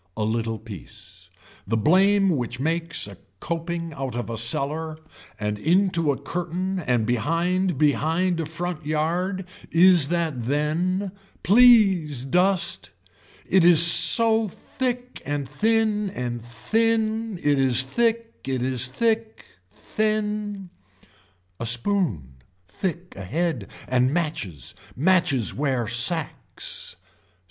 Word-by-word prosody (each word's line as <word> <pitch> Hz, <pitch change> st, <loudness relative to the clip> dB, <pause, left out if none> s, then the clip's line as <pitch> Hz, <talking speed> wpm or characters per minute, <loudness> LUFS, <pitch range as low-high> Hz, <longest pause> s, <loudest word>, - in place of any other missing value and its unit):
A 110 Hz, -, -2 dB
little 110 Hz, +1 st, -2 dB
piece. 95 Hz, -3 st, -12 dB, 0.4 s
The 115 Hz, +2 st, -1 dB
blame 195 Hz, -, +3 dB
which 125 Hz, -5 st, -3 dB
makes 165 Hz, +3 st, 0 dB
a 100 Hz, -2 st, -11 dB, 0.2 s
coping 170 Hz, -, -5 dB
out 135 Hz, -4 st, -6 dB
of 120 Hz, -1 st, -5 dB
a 115 Hz, -, -5 dB
cellar 150 Hz, +7 st, -2 dB, 0.4 s
and 105 Hz, 0 st, -3 dB
into 170 Hz, -, +1 dB
a 135 Hz, -, -4 dB
curtain 180 Hz, +2 st, -4 dB
and 125 Hz, -8 st, -1 dB
behind 165 Hz, -, -1 dB
behind 160 Hz, +5 st, 0 dB
a 165 Hz, -, -2 dB
frontyard 170 Hz, +3 st, -3 dB, 0.2 s
is 175 Hz, -3 st, +4 dB
that 160 Hz, -7 st, -2 dB
then. 170 Hz, +7 st, -1 dB, 0.3 s
Please 195 Hz, -, +4 dB
dust. 180 Hz, +5 st, 0 dB, 0.6 s
It 190 Hz, -2 st, +2 dB
is 170 Hz, -1 st, +9 dB
so 225 Hz, +5 st, +7 dB
thick 250 Hz, +5 st, -5 dB
and 145 Hz, -1 st, -4 dB
thin 210 Hz, -, 0 dB
and 120 Hz, -7 st, -5 dB
thin, 220 Hz, -, -1 dB
it 145 Hz, -4 st, 0 dB
is 130 Hz, -1 st, +3 dB
thick. 230 Hz, -, -1 dB
It 130 Hz, -2 st, -2 dB
is 130 Hz, -1 st, 0 dB
thick, 225 Hz, -, -2 dB, 0.3 s
thin. 210 Hz, -, -3 dB, 0.9 s
A 115 Hz, -, -4 dB
spoon, 115 Hz, -, -2 dB, 0.3 s
thick 180 Hz, -, -5 dB
ahead 130 Hz, -, -3 dB, 0.2 s
and 130 Hz, +1 st, +1 dB
matches, 140 Hz, -, -4 dB, 0.2 s
matches 165 Hz, -, +1 dB
wear 130 Hz, -5 st, -2 dB
sacks. 135 Hz, +8 st, 0 dB
165 Hz, 110 wpm, -23 LUFS, 125-190 Hz, 0.9 s, is